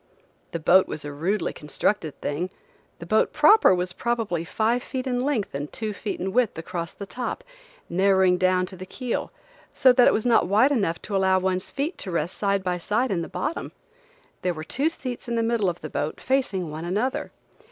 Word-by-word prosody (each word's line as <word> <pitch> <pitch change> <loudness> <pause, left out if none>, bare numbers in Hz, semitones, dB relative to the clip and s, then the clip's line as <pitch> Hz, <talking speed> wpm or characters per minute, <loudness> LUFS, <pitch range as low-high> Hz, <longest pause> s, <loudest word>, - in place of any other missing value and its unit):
The - - -2
boat 185 +4 +5
was 150 - -6
a 145 - -4
rudely 175 +6 -1
constructed 155 0 -2
thing. 165 +6 -2 0.5
The 170 - -9
boat 215 +5 +2
proper 305 - +6
was 180 0 -2
probably 225 -8 -1
five 225 +7 0
feet 260 0 -4
in 250 -2 0
length 255 -5 -1
and 145 +2 -4
two 215 -2 -4
feet 205 0 -5
in 190 +1 -3
width 245 -7 +2
across 170 0 -4
the 200 - -8
top, 245 +5 -4 0.4
narrowing 190 0 +3
down 185 0 +3
to 185 - -9
the 185 +1 -9
keel, 250 +1 -3 0.4
so 260 -1 +6
that 250 -1 +6
it - - +7
was 215 - 0
not 235 -7 +4
wide 220 +9 +4
enough 195 - 0
to 205 - -4
allow 190 -1 +3
one's 185 0 -1
feet 295 +6 -3
to 195 - -3
rest 170 +1 -2
side 200 -1 0
by 180 -1 -1
side 215 +8 0
in 175 -3 0
the 165 - -5
bottom. 335 - -3 0.7
There 180 -2 -1
were 155 - -6
two 275 - 0
seats 255 -6 -6
in 235 - -1
the 230 - +1
middle 225 -4 +1
of 175 -1 -6
the 155 - -5
boat 150 - -3
facing 205 - 0
one 155 +2 -6
another. 210 +10 -1
195 Hz, 205 wpm, -25 LUFS, 175-240 Hz, 0.7 s, it